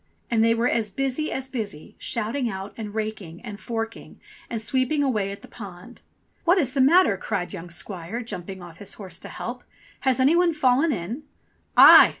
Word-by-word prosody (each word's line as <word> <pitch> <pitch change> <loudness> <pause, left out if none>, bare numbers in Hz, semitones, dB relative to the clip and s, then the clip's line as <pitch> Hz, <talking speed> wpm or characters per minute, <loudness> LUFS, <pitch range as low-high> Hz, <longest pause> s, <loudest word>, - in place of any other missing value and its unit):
And 225 -1 +3
they 230 0 +4
were 230 +2 +1
as 225 -3 +1
busy 270 +7 -2
as 265 0 -3
busy, 215 - -5
shouting 235 +3 -1
out, 195 0 -6
and 215 -2 -7
raking, 215 -6 -4
and 210 -4 -8
forking, 225 0 -5 0.3
and 230 - -2
sweeping 260 +6 +1
away 210 -8 0
at 200 - -9
the - - -11
pond. 200 +2 -11 0.4
"What 350 +3 +4
is 265 -8 +1
the 275 - +2
matter?" 285 - +5
cried 195 -2 -3
young 175 -2 -7
squire, 180 +5 -5
jumping 190 -4 -6
off 170 -1 -11
his 200 -1 -5
horse 185 -5 -7
to - - -9
help. 245 +1 -6 0.4
"Has 265 -2 +1
any 275 +6 +5
one 350 -1 +3
fallen 280 +2 +3
in 220 - -4 0.3
?" - - -40
"Aye! - - +10
225 Hz, 190 wpm, -25 LUFS, 195-260 Hz, 0.4 s, Aye